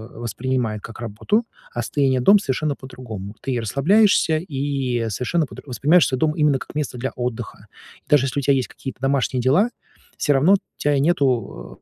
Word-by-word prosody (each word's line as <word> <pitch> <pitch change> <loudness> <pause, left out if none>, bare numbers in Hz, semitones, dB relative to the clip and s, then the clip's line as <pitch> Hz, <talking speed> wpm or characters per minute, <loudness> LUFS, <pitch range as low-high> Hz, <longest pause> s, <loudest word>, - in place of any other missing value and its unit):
воспринимает 120 -1 -2
как 115 +1 -10
работу, 120 - -1 0.3
а 120 - -2
состояние 130 +1 +1
"дом"- 200 +11 +6
совершенно 150 -3 -1
по-другому. 115 -7 -9
Ты 135 - -3
и 125 - 0
расслабляешься, 160 - +3
и 135 -6 -2
совершенно 140 - 0
по - - -12
дру - - -11
воспринимаешь 150 +6 +3
свой 130 - -2
дом 155 +1 +2
именно 150 -3 +3
как - - -10
место 150 -4 -3
для 130 +2 -3
отдыха. 125 -2 -5 0.4
И - - -34
даже 145 -3 +4
если 135 - -2
у 140 - -4
тя 140 - +4
есть 130 -2 0
какие-то 135 -2 -8
домашние 135 -2 +1
дела, 155 - +3 0.5
всё 145 - +1
равно 155 +9 +5 0.2
тя 145 -1 +1
нету, 135 - 0
135 Hz, 185 wpm, -22 LUFS, 120-150 Hz, 0.5 s, дом